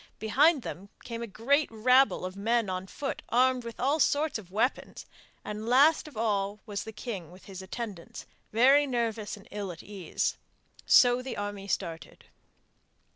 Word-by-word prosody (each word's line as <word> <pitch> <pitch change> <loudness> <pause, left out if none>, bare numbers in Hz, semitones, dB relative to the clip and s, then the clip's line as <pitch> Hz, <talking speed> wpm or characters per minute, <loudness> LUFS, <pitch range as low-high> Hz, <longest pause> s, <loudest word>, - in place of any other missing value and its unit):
Behind 275 +6 +3
them 195 +4 -7
came 230 -1 -6
a 235 - -4
great 275 +9 +1
rabble 250 0 +3
of 185 +1 -6
men 225 0 0
on 185 +1 -4
foot 275 +7 -5
armed 255 +1 +3
with 235 -1 -8
all 280 +5 +1
sorts 290 -2 +1
of 185 -4 -13
weapons, 225 +7 -1 0.4
and 210 +2 -5
last 290 +6 +5
of 295 - -12
all 205 -2 -1
was 205 -2 -5
the 220 - -7
king 215 -6 -6
with 180 +2 -16
his 190 -1 -9
attendants, 195 -2 -7 0.3
very 270 +6 +5
nervous 230 -5 -2
and 200 - -16
ill 200 -2 -4
at 170 - -11
ease. 195 -5 -3 0.5
So 245 0 +6
the 260 0 -6
army 205 -1 -5
started. 170 -4 -4
220 Hz, 165 wpm, -29 LUFS, 200-255 Hz, 0.5 s, So